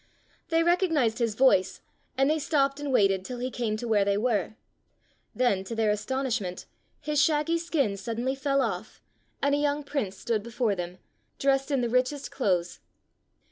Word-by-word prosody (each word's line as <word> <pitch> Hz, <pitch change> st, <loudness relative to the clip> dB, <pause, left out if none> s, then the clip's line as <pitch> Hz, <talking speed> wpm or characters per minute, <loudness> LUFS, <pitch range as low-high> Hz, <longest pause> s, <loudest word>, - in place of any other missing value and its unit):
They 330 Hz, 0 st, +3 dB
recognized 325 Hz, -, +2 dB
his 230 Hz, -3 st, 0 dB
voice, 195 Hz, -7 st, +3 dB, 0.4 s
and 270 Hz, 0 st, +3 dB
they 310 Hz, +1 st, +2 dB
stopped 280 Hz, -2 st, +1 dB
and 290 Hz, -1 st, -3 dB
waited 195 Hz, -6 st, +3 dB
till 250 Hz, +5 st, -6 dB
he 250 Hz, +1 st, -3 dB
came 225 Hz, -4 st, -2 dB
to 240 Hz, -, -5 dB
where 210 Hz, -3 st, +3 dB
they 200 Hz, 0 st, +1 dB
were. 220 Hz, -1 st, 0 dB, 0.8 s
Then, 220 Hz, -7 st, +2 dB
to 230 Hz, -, -5 dB
their 220 Hz, -2 st, +2 dB
astonishment, 215 Hz, -3 st, -2 dB, 0.3 s
his 300 Hz, -1 st, +1 dB
shaggy 305 Hz, +2 st, +2 dB
skin 290 Hz, -12 st, 0 dB
suddenly 235 Hz, +6 st, -2 dB
fell 275 Hz, 0 st, +1 dB
off, -, -, -4 dB, 0.4 s
and 280 Hz, 0 st, +3 dB
a 285 Hz, -, +2 dB
young 290 Hz, 0 st, 0 dB
prince 250 Hz, -10 st, -3 dB
stood 225 Hz, -3 st, -1 dB
before 235 Hz, 0 st, -1 dB
them, 180 Hz, -1 st, -5 dB, 0.4 s
dressed 270 Hz, 0 st, +1 dB
in 275 Hz, -3 st, +1 dB
the 240 Hz, -, 0 dB
rich 255 Hz, +2 st, +2 dB
est 290 Hz, -2 st, -7 dB
clothes. 180 Hz, -8 st, -1 dB
250 Hz, 175 wpm, -27 LUFS, 210-280 Hz, 0.8 s, They